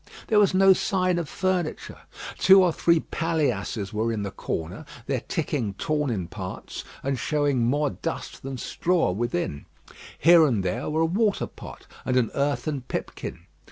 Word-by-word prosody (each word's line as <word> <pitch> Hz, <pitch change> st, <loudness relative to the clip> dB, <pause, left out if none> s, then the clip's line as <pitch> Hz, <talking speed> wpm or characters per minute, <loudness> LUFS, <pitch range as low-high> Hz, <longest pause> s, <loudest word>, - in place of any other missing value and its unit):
There 215 Hz, -, +5 dB
was 200 Hz, -2 st, +4 dB
no 195 Hz, 0 st, +7 dB
sign 185 Hz, -2 st, +1 dB
of 165 Hz, -, -4 dB
furniture. 185 Hz, -4 st, -2 dB, 0.4 s
Two 190 Hz, 0 st, +7 dB
or 175 Hz, -3 st, +2 dB
three 170 Hz, 0 st, +3 dB
paillasses 125 Hz, -10 st, -1 dB
were 110 Hz, +2 st, 0 dB
in 110 Hz, -2 st, -2 dB
the 100 Hz, -, -4 dB
corner, 90 Hz, -, -4 dB, 0.2 s
their 135 Hz, -2 st, -1 dB
ticking 140 Hz, -, -2 dB
torn 150 Hz, -3 st, -1 dB
in 95 Hz, -7 st, -2 dB
parts, 95 Hz, 0 st, -7 dB, 0.2 s
and 135 Hz, -1 st, -1 dB
showing 145 Hz, -3 st, +1 dB
more 145 Hz, +4 st, +1 dB
dust 90 Hz, -, -5 dB
than 135 Hz, -1 st, -5 dB
straw 170 Hz, -, 0 dB
within. 90 Hz, -8 st, -2 dB, 0.5 s
Here 170 Hz, 0 st, +7 dB
and 110 Hz, -8 st, 0 dB
there 90 Hz, -, -2 dB
were 155 Hz, +1 st, 0 dB
a -, -, +4 dB
water 200 Hz, +5 st, +1 dB
pot -, -, -11 dB, 0.2 s
and 130 Hz, -, 0 dB
an 120 Hz, -3 st, +2 dB
earthen 140 Hz, 0 st, -1 dB
pipkin. 125 Hz, -, -5 dB
145 Hz, 160 wpm, -25 LUFS, 115-170 Hz, 0.5 s, no